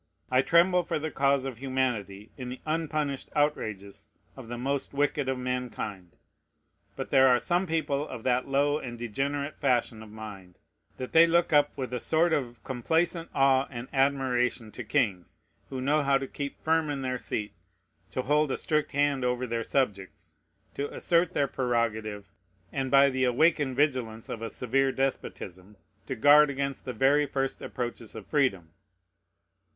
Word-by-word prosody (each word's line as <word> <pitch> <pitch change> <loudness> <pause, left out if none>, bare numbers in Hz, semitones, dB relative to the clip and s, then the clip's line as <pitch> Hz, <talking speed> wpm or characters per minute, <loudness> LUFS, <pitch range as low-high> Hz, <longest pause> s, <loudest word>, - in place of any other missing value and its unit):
I 130 0 +5
tremble 175 +5 +4
for - - -2
the 155 +1 -4
cause 140 -1 +2
of 130 -4 -5
humanity, 120 -7 -2
in 125 -2 -6
the 125 - -7
unpunished 155 -3 -2
outrages 110 -9 -2 0.3
of 130 -4 -10
the 120 +1 -5
most 140 +3 -3
wicked 145 -1 0
of 130 - -1
mankind. 125 -8 -4 0.8
But - - -5
there 135 0 +6
are 125 -1 +5
some 175 +7 0
people 155 -3 -1
of 115 - -8
that 125 0 +1
low 145 +2 +2
and 120 -4 -7
degenerate 140 +5 -3
fashion 120 -5 +1
of 110 - -11
mind 105 -4 -10 0.4
that 130 - -6
they 165 +1 +7
look 170 0 +2
up 145 0 +3
with 130 -2 -4
a 125 - -1
sort 160 +6 +2
of 120 -7 -2
complacent 165 +7 -1
awe 135 0 +4
and 120 -1 -7
admiration 130 -4 +1
to 120 - -7
kings 105 -7 -1 0.3
who 130 - -5
know 140 +1 +2
to 135 0 -5
keep 140 +1 -6
firm 160 -1 +2
in 140 -2 -3
their 125 -1 -2
seat, 105 -2 -4 0.6
to 130 - -3
hold 150 +2 +2
a - - -1
strict 155 -2 -1
hand 145 -2 +1
over 125 0 0
their 115 -1 -2
subjects, 105 -8 -2 0.4
to 140 +1 -4
assert 170 0 +1
their 140 - +2
prerogative, 110 -6 -2 0.4
and, 135 -1 -2
by 140 +1 +6
the 130 0 0
awakened 135 +1 +2
vigilance 125 -6 0
of 115 - -5
a 115 - -3
severe 135 +3 0
despotism, 105 -7 -4 0.3
to 130 - -3
guard 145 +5 +6
against 140 0 -3
the 125 - -4
very 145 +3 +3
first 135 -1 -2
approaches 120 -3 -5
of - - -8
freedom. 95 - 0
130 Hz, 165 wpm, -28 LUFS, 120-145 Hz, 0.8 s, they